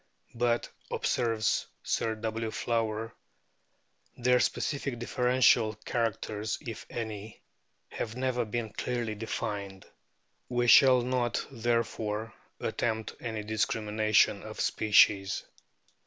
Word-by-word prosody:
" - - -34
But," 120 -1 +2 0.2
observes 115 -3 0 0.2
Sir 110 -1 0
W. 110 0 -3
Flower, 115 -1 -2 1.0
"their 125 +1 +3
specific 140 -2 -1
differential 125 -2 +3
characters, 110 -1 -2
if 115 -4 -8
any, 110 -2 -6 0.5
have 110 0 -5
never 125 -1 0
been 110 -1 -4
clearly 120 -1 -2
defined." 100 -3 -4 0.6
We 120 -1 +1
shall 130 +1 +7
not, 125 -1 0
there 115 -1 +1
fore, 110 0 -4 0.3
attempt 110 -2 -2
any 110 -2 -4
discrimination 110 0 +2
of - - -9
species. 100 -2 +3
115 Hz, 100 wpm, -30 LUFS, 110-120 Hz, 1.0 s, shall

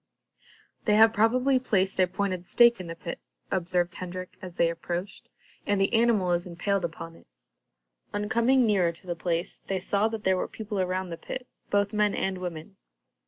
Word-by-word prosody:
"They 210 - +4
have 220 +1 +7
probably 250 +5 +3
placed 195 -6 +1
a 185 - +5
pointed 185 -1 -3
stake 235 -2 +5
in 180 - -6
the 165 - -6
pit," 170 0 -6 0.3
observed 180 -1 0
Hendrik, 185 0 -7
as 180 -2 -9
they 170 - +4
approached, 175 +3 -5 0.4
"and 205 -1 +2
the 195 +4 +2
animal 225 -6 +3
is 175 +1 0
impaled 185 +3 -1
upon 165 0 -5
it." - - -20 0.8
On 205 0 -2
coming 240 +3 +3
nearer 190 -6 +3
to 170 +3 -16
the 175 -1 -3
place, 170 0 -2
they 195 - -3
saw 200 +3 +1
that 225 -1 -5
there 190 0 +3
were - - -1
people 210 -2 -5
around 185 0 -1
the 165 - -5
pit, 250 +9 -6 0.2
both 205 +1 +1
men 210 -1 +2
and 190 -1 -1
women. 175 +1 -7
190 Hz, 185 wpm, -27 LUFS, 175-210 Hz, 0.8 s, have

